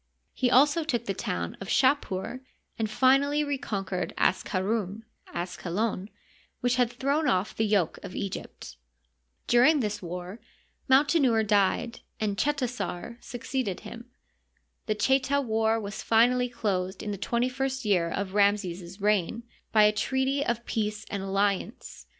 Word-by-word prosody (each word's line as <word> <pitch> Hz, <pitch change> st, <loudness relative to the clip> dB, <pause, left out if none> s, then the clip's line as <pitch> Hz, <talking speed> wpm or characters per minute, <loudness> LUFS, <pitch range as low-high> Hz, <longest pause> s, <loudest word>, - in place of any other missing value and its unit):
He 250 Hz, -, +1 dB
also 290 Hz, +6 st, +4 dB
took 240 Hz, -6 st, -1 dB
the 195 Hz, -, -1 dB
town 85 Hz, -, -3 dB
of 195 Hz, -, -6 dB
Shapur, 255 Hz, -5 st, +1 dB, 0.4 s
and 220 Hz, -1 st, 0 dB
finally 275 Hz, +5 st, +3 dB
reconquered 200 Hz, -10 st, -3 dB
Asqarun 200 Hz, +2 st, 0 dB, 0.3 s
(Asqalon) 185 Hz, +3 st, -2 dB, 0.5 s
which 245 Hz, -1 st, +1 dB
had 245 Hz, -2 st, +2 dB
thrown 280 Hz, +5 st, 0 dB
off 185 Hz, +2 st, +1 dB
the 220 Hz, -, +1 dB
yoke 200 Hz, -6 st, +1 dB
of 195 Hz, -, -8 dB
Egypt. 125 Hz, -, -6 dB, 0.7 s
During 255 Hz, +6 st, +5 dB
this 210 Hz, -4 st, -2 dB
war 180 Hz, +4 st, -6 dB, 0.5 s
Mautenouer 265 Hz, -4 st, +4 dB
died, 205 Hz, +3 st, +1 dB, 0.2 s
and 210 Hz, -2 st, -1 dB
Chetasar 245 Hz, -4 st, -2 dB
succeeded 245 Hz, -4 st, -3 dB
him. 235 Hz, +1 st, -10 dB, 0.8 s
The 215 Hz, -, +1 dB
Cheta 265 Hz, +5 st, +2 dB
war 225 Hz, -3 st, +1 dB
was 205 Hz, -1 st, -6 dB
finally 245 Hz, +2 st, +3 dB
closed 190 Hz, -5 st, -2 dB
in 210 Hz, -, -3 dB
the 200 Hz, -, -4 dB
twenty 235 Hz, +4 st, 0 dB
first 265 Hz, 0 st, -3 dB
year 180 Hz, -5 st, +2 dB
of 190 Hz, +2 st, -3 dB
Ramses's 195 Hz, -3 st, +1 dB
reign 210 Hz, +2 st, +1 dB, 0.3 s
by 215 Hz, -1 st, +6 dB
a 210 Hz, -, +6 dB
treaty 265 Hz, +6 st, 0 dB
of 235 Hz, -2 st, -2 dB
peace 215 Hz, -1 st, -2 dB
and 200 Hz, -, -2 dB
alliance. 200 Hz, +4 st, -2 dB
220 Hz, 135 wpm, -27 LUFS, 195-255 Hz, 0.8 s, by